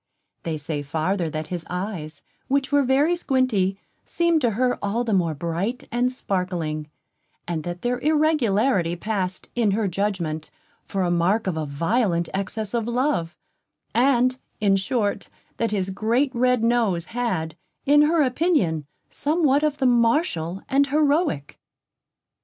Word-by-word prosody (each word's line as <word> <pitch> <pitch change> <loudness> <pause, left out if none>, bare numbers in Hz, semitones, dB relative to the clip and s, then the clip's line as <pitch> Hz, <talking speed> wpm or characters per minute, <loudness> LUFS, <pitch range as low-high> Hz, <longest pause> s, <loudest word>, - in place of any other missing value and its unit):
They 160 -2 -3
say 150 0 -4
farther, 160 +4 -1
that 155 0 -5
his 175 -2 -3
eyes, 180 -5 -5 0.2
which 275 0 0
were 285 0 +4
very 280 +6 +3
squinting, 255 - +1 0.3
seemed 340 -2 +1
to 245 - +3
her 250 0 +1
all 210 +4 0
the 225 -3 -1
more 170 -5 +1
bright 170 - -3
and 245 +2 +1
sparkling; 175 -9 -3 0.6
that 175 +1 -4
their 245 0 0
irregularity 260 - +2
passed 190 -1 -3
in 235 -3 +2
her 220 -3 +1
judgment 175 -5 -2 0.4
for 195 -1 -1
a 175 - +1
mark 175 +6 +2
of 185 -4 -1
a 155 -1 -3
violent 170 - 0
excess 200 +2 -3
of 235 -2 -1
love; 240 - 0 0.6
and, 255 0 +3 0.2
in 200 -2 +3
short, 205 0 -1 0.3
that 230 - 0
his 195 -2 -1
great 235 +8 +1
red 250 -1 +2
nose 225 -8 +2
had, 185 -10 -2 0.3
in 295 +1 +6
her 310 +1 +4
opinion, 250 - +1 0.2
somewhat 295 -2 +2
of 305 -1 0
the 270 - 0
martial 230 - +1
and 280 +1 +3
heroic. 290 - +1
215 Hz, 140 wpm, -23 LUFS, 175-255 Hz, 0.6 s, in